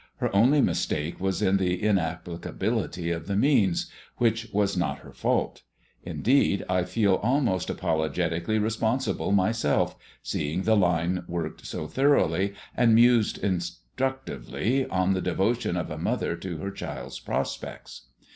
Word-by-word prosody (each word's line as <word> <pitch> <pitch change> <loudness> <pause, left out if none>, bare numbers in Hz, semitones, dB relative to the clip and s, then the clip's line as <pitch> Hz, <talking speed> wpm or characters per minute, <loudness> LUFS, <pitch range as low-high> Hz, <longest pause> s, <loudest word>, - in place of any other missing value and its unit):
Her - - -1
only 130 +8 +5
mistake 75 - -1
was 95 -1 -1
in 95 +1 +3
the 90 -2 0
inapplicability 85 -2 -1
of 85 0 -4
the 100 - -1
means, 105 - +3 0.3
which 115 -1 +1
was 100 -1 +1
not 90 -1 -1
her - - -13
fault. - - -1 0.4
Indeed, 125 -5 +2
I 90 -1 +1
feel 95 +1 +2
almost 120 -5 +1
apologetically 85 +3 -1
responsible 110 +3 0
myself, 100 -5 +2 0.3
seeing 80 +6 -2
the 110 +2 +4
line 90 -1 +1
worked 85 -2 -4
so - - -4
thoroughly, 100 - +2 0.2
and 115 -2 +4
mused 120 -1 +4
instructively 115 - -2
on 95 +1 +1
the 95 - -1
devotion 105 -1 0
of 85 -2 -3
a 75 - -5
mother 85 - -1
to 85 -1 -6
her 100 +5 -4
child's - - -6
prospects. - - -5
95 Hz, 135 wpm, -26 LUFS, 85-115 Hz, 0.4 s, only